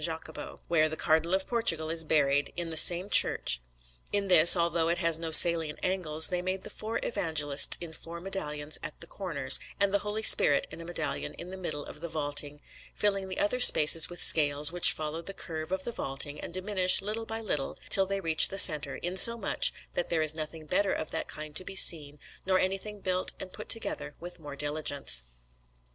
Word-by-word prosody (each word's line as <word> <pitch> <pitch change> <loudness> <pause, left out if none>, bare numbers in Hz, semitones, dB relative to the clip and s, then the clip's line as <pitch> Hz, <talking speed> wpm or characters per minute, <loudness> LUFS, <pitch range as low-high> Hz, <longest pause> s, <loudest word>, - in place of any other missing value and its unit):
Jacopo, 160 0 -8
where 155 -2 0
the 160 - -7
Cardinal 160 +4 -1
of 190 - -4
Portugal 165 -10 0
is 165 0 -1
buried, 145 -2 -1
in 170 -1 -7
the - - -7
same 175 +4 +5
church. - - +2 0.5
In 200 -1 -3
this, 170 0 +7
although 170 -1 -1
it 170 - -2
has 165 -2 +1
no 165 -1 -6
salient 160 -1 +6
angles, 160 -4 +1
they 180 -1 -4
made 185 +1 -6
the - - -10
four 220 +1 -7
Evangelists 155 -9 +1
in 170 -2 -11
four 170 +2 -12
medallions 155 -5 -7
at 155 -2 -10
the - - -13
corners, 165 -8 -1 0.2
and 200 0 -1
the 200 - 0
Holy 210 +2 -6
Spirit 145 -8 +5
in 170 - -12
a - - -12
medallion 175 - -6
in 175 +2 -12
the - - -9
middle 155 -5 -6
of 150 - -13
the 170 - -7
vaulting, 145 -1 -4 0.3
filling 195 -2 -3
the 185 - -8
other 230 +5 -2
spaces 160 -8 +7
with 175 - -10
scales 145 -1 +1
which 175 0 +5
follow 155 +1 -6
the 195 +3 -10
curve 160 0 -7
of 190 0 -4
the 235 - -5
vaulting 145 -4 -6
and - - -10
diminish 185 0 0
little 220 +2 -6
by 225 +1 -6
little 150 -11 -5
till 195 -1 +3
they 195 0 -4
reach 160 -4 +3
the 195 - -8
centre, 150 -7 +5
insomuch 190 +5 +4 0.2
that 175 - -5
there 160 -2 -2
is 155 0 +2
nothing 155 0 -9
better 195 +5 -2
of 155 - -6
that - - -6
kind 155 0 -9
to 185 - +1
be 195 - -10
seen, 150 -6 +4 0.3
nor 190 0 -1
anything 195 +2 -5
built 185 0 -3
and 185 - -10
put - - -12
together 225 -9 -3
with 175 +1 -11
more 145 -2 -11
diligence. 145 - -3
170 Hz, 205 wpm, -26 LUFS, 155-190 Hz, 0.5 s, this